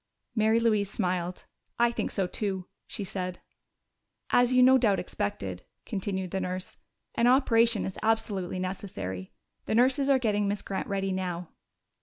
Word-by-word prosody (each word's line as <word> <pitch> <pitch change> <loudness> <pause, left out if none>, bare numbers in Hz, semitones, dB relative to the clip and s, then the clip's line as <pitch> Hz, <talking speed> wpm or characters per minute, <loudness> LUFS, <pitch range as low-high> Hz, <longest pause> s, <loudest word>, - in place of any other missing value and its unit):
Mary 220 0 +3
Louise 215 -4 +2
smiled. 180 -3 -2 0.3
"I 235 0 +4
think - - -2
so 195 - 0
too," 190 0 -3 0.2
she 205 - -4
said. 185 -1 -4 0.9
"As 245 0 +5
you 255 0 +6
no 260 +1 +7
doubt 210 -5 +3
expected," 95 - -4 0.2
continued 190 -3 -3
the 190 - -1
nurse, 185 0 -4 0.4
"an 235 - +3
operation 235 -3 +4
is 190 - -5
absolutely 215 -5 0
necessary. 100 - -5 0.4
The - - +1
nurses 265 +4 +3
are 275 - +6
getting 210 -5 +1
Miss 205 +1 -2
Grant 195 - -3
ready 195 -1 -1
now." 180 -2 -3
200 Hz, 150 wpm, -28 LUFS, 185-230 Hz, 0.9 s, no